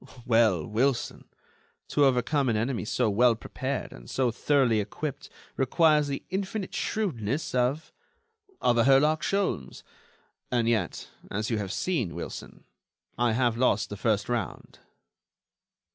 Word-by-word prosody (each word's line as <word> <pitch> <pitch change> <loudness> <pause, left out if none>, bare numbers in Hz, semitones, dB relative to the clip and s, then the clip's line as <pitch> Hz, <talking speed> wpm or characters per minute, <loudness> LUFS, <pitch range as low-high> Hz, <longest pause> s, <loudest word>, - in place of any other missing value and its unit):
"Well, 115 -9 +3
Wilson, 120 +4 -1 0.6
to 145 - +3
overcome 135 +1 +2
an 110 - +1
enemy 115 +1 -1
so 120 +2 +1
well 115 +3 +4
prepared - - -4
and - - -12
so 130 -3 +1
thoroughly 125 -2 +2
equipped 125 +8 -5 0.3
requires 150 +2 +3
the 140 -1 -4
infinite 195 +1 -3
shrewdness 145 - -2
of... 130 +5 0 0.7
of 120 -1 +3
a 115 - +4
Herlock 150 +3 +4
Sholmes. 190 - -2 0.7
And 120 -2 +1
yet, 110 -7 -1 0.2
as 105 +3 -2
you 110 - 0
have 100 -2 -4
seen, 125 - -1
Wilson, - - -8 0.5
I 120 -1 +1
have 120 -1 +1
lost 115 -5 +1
the - - -3
first 105 0 0
round." 120 -1 -4
125 Hz, 130 wpm, -27 LUFS, 110-145 Hz, 0.7 s, well